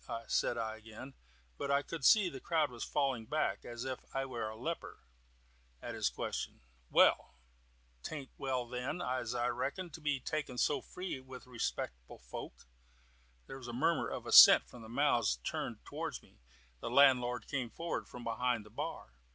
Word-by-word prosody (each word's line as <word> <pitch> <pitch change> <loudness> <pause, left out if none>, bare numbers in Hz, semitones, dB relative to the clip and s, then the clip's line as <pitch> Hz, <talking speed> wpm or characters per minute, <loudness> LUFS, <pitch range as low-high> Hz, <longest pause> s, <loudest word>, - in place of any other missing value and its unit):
said 120 - +1
I 110 -1 -3
again, 110 +5 -10 0.5
but 140 - -2
I 140 0 +3
could 165 -2 -6
see 205 +5 +6
the 135 -6 -6
crowd 155 -1 +1
falling 135 -6 0
back, 155 +1 0
as 120 +1 -6
if 130 -1 -4
I 135 0 0
was 120 -4 -4
a - - -9
leper, 165 +7 -5 0.8
at - - -6
his - - +1
question. - - -4 0.3
"Well? - - +4 0.7
'Taint 140 - -6
well 130 -3 -2
then, 125 +7 -3
as 125 -4 -2
I 120 0 +1
reckon, 140 +9 -3
to 160 - -9
be 145 -3 -1
making 145 -5 -2
so 140 +2 +2
free 180 -3 -5
with 130 -1 -11
respectable 85 - -4
folk." - - -9 0.8
There 135 - -8
was 125 - -9
a 120 - -5
murmur 160 +6 +1
of - - -5
assent - - +10
from 125 - -12
the 110 - -10
mouths 120 - +2
turned - - -4
towards - - -5
me. - - -23 0.4
The - - -4
landlord 125 -3 +4
came 130 -4 -2
forward 170 +7 -4
from 125 - -9
behind 115 -1 0
the 105 - -15
bar. - - -5
130 Hz, 170 wpm, -34 LUFS, 120-140 Hz, 0.8 s, assent